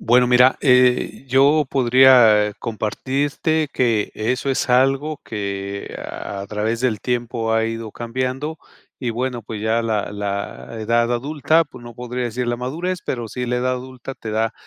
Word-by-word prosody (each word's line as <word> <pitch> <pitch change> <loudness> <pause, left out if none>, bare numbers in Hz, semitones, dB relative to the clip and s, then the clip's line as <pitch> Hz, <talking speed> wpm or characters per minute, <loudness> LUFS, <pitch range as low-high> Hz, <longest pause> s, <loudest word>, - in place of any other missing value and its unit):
Bueno, 125 +2 +4
mira, 125 +1 +5
eh, 125 -1 +3
yo 140 +3 +4
podría 120 -5 +5
compartirte 140 +7 -1
que 115 -5 +1
eso 125 +5 -1
es 130 - -1
algo 135 +4 +2
que 100 -1 -5
a 100 0 -6
través 110 +2 -2
del 120 -5 0
tiempo 120 -2 -2
ha 110 0 +2
ido 115 -1 -5
cambiando, 130 +6 -3 0.4
y 125 -3 -1
bueno, 120 +1 -3
pues, 110 0 -7
ya 110 +1 +1
la 110 -3 -1
la 100 +2 -5
edad 115 +2 +1
adulta, 150 +6 +1
pues, - - -14
no 120 0 -10
podría 125 +1 -4
decir 120 +1 -3
la 120 - 0
madurez, 165 +9 -3
pero 120 -3 -3
sí 125 +2 -4
la 125 +1 0
edad 130 +1 0
adulta 130 +1 -8
te 110 - -7
da 110 +1 0
120 Hz, 160 wpm, -21 LUFS, 110-130 Hz, 0.4 s, mira